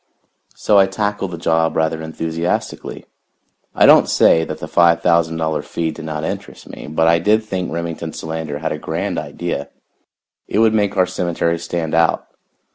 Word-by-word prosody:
So 105 -2 +3
I 95 - +5
tackled 100 0 -2
the 85 - -6
job 80 0 +1
rather 80 0 0
enthusiastically. 80 +2 -4 0.7
I - - +5
don't - - +6
say 80 - +4
that - - -5
the - - -7
five 85 -1 +3
thousand 85 -2 +2
dollar 80 -1 -1
fee 80 -1 -3
did 80 - -9
not 75 -1 -4
interest - - -6
me, - - -9
but 80 +2 +1
I 85 0 +4
did 105 +5 +2
think 95 -4 -4
Remington 85 -1 -4
Solander 80 -2 -5
had 80 +2 -3
a 75 - -4
grand - - -3
idea. 85 -5 -5 0.8
It - - -2
would 110 0 +4
make 105 -2 0
our 90 - +4
cemetery 85 -2 -1
stand 85 -1 -3
out. 85 0 +2
85 Hz, 175 wpm, -19 LUFS, 80-90 Hz, 0.8 s, don't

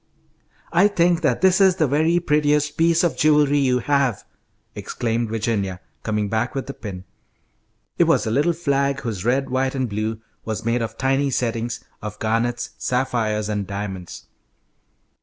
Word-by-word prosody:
"I 180 +4 +6
think 175 -3 +2
that 135 -7 +1
this 190 +1 +4
is 190 -2 +5
the 165 -4 +2
very 160 +5 +2
prettiest 150 -2 +1
piece 165 +1 +3
of 170 - +1
jewelry 150 -1 +4
you 130 -2 +2
have," 135 -4 +1 0.5
exclaimed 115 -1 -2
Virginia, 105 -4 -2 0.2
coming 105 -1 -1
back 110 +5 -1
with 135 - -2
the 140 - -6
pin. 95 -8 -8 1.0
It - - +6
was - - +2
a 110 - -1
little 150 +8 +2
flag 140 -4 0
whose 110 -7 -4
red, 130 +3 +1
white, 130 +1 0
and 130 -2 0
blue 110 +1 -3 0.2
was 110 0 -4
made 115 +1 +1
of 115 0 -4
tiny 135 +1 +1
settings 120 -2 -2 0.2
of 105 0 -6
garnets, 115 +3 -1
sapphires, 115 -5 0
and 105 -2 -2
diamonds. 100 -3 -6
125 Hz, 160 wpm, -22 LUFS, 110-145 Hz, 1.0 s, I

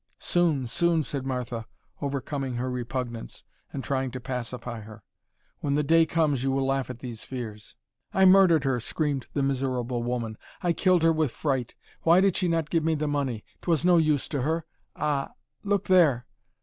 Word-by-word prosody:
"Soon, 165 -7 +1
soon," 165 +6 +2
said 135 -2 -4
Martha, 120 -3 -3 0.3
overcoming 140 -2 -3
her 125 +2 -2
repugnance 125 -1 -5 0.3
and 135 - -5
trying 135 -1 -1
to 130 - -6
pacify 125 -2 -5
her. 110 0 -12 0.6
"When 140 -1 0
the 150 - +2
day 165 +2 +4
comes 155 -6 +1
you 135 - +1
will 135 0 +1
laugh 135 -1 0
at 125 -2 -7
these 120 -4 -6
fears." 110 -5 -7 0.4
"I 190 - +4
murdered 185 -5 +6
her," 130 -2 +1
screamed 140 +2 -2
the 140 - 0
miserable 130 -3 -1
woman, 120 -2 -3 0.2
"I 175 -1 +2
killed 180 -1 +3
her 165 0 +5
with 155 -3 +1
fright. 130 -2 -2 0.3
Why 170 +2 +5
did 195 -1 +3
she 185 - +1
not 165 -2 0
give 165 -2 +2
me 160 0 +2
the 150 0 -1
money? 140 -7 -2 0.2
'Twas 170 -2 +1
no 180 -1 +6
use 155 -4 +2
to 145 -4 -1
her. 160 +4 -1 0.3
Ah! 145 -2 -1 0.3
Look 200 -1 0
there!" 155 -11 +4
140 Hz, 180 wpm, -27 LUFS, 125-160 Hz, 0.6 s, murdered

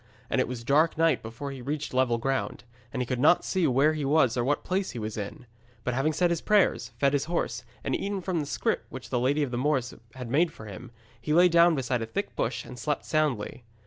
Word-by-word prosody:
And - - +3
it - - 0
was 120 -1 -6
dark 155 +6 +3
night 165 0 +3
before 115 +5 -6
he 135 -2 -8
reached 145 +3 -4
level 125 -2 +2
ground, 130 0 -2 0.3
and 125 - -1
he - - -5
could 125 0 -2
not 150 +6 +4
see 185 -4 +1
where 140 +4 +3
he 155 -1 -3
was 135 -4 +3
or 120 - +1
what 145 +4 0
place 190 +1 -1
he - - -7
was 110 -1 -4
in. 105 +3 -6 0.4
But 125 - -1
having 135 +5 +1
said 175 +3 +1
his 170 - -1
prayers, 200 - +2
fed 140 +2 +2
his 140 -1 +1
horse, 130 -8 -2 0.2
and - - 0
eaten 200 0 -2
from 180 -2 -1
the 145 - -3
scrip - - -1
which - - -9
the 125 - +1
Lady 140 +5 +2
of 135 - -3
the 120 - -2
Moors 135 -3 0 0.2
had 125 -3 -7
made 160 +6 +4
up 160 - -17
for 110 - -10
him, 100 -3 -9 0.3
he 150 - -1
lay 180 +1 +7
down 170 0 +5
beside 125 -3 -1
a 115 - -3
thick 115 - -4
bush - - -2
and 125 0 -10
slept 150 +4 -2
soundly. 140 -7 -1
135 Hz, 250 wpm, -27 LUFS, 120-155 Hz, 0.4 s, lay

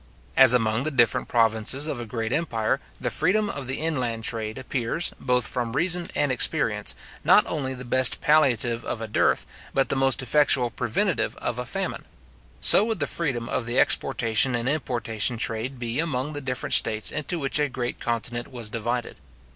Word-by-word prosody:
As 130 -3 +8
among 110 -1 0
the 155 - -2
different 120 -6 +1
provinces 115 +4 +2
of 140 -6 -3
a 120 - -8
great 115 +1 -4
empire, 135 -6 -1 0.2
the - - -3
freedom 200 +5 +1
of 140 -3 -6
the 130 - 0
inland 125 -8 -2
trade 110 -2 -3
appears, 130 +5 -2
both 125 -2 0
from 120 -2 -4
reason 175 +4 +1
and 145 -2 +1
experience, 125 - 0 0.3
not - - +6
only 130 -4 -2
the 125 0 -8
best 130 +1 +4
palliative 120 -6 +2
of - - -5
a 115 - -6
dearth, 105 - +1 0.3
but 135 - +1
the - - 0
most 135 -1 +1
effectual 130 -2 +2
preventive 175 - -1
of 120 0 -4
a 125 - -5
famine; 195 +7 -4 0.6
so - - +6
would 220 -3 -2
the - - +1
freedom 130 -8 +2
of 120 -3 -3
the 120 +2 -2
exportation 120 +2 +2
and 120 +1 -2
importation 120 -5 -1
trade 115 +4 -2
be 120 +2 -4
among 150 -3 -2
the 145 - -6
different 130 -2 -3
states 110 -1 +3
into 170 +4 -3
which 140 -1 +1
a 145 -1 0
great 125 -1 -5
continent 120 +1 -4
was 120 -4 -6
divided. 120 +2 -4
125 Hz, 180 wpm, -24 LUFS, 115-145 Hz, 0.6 s, As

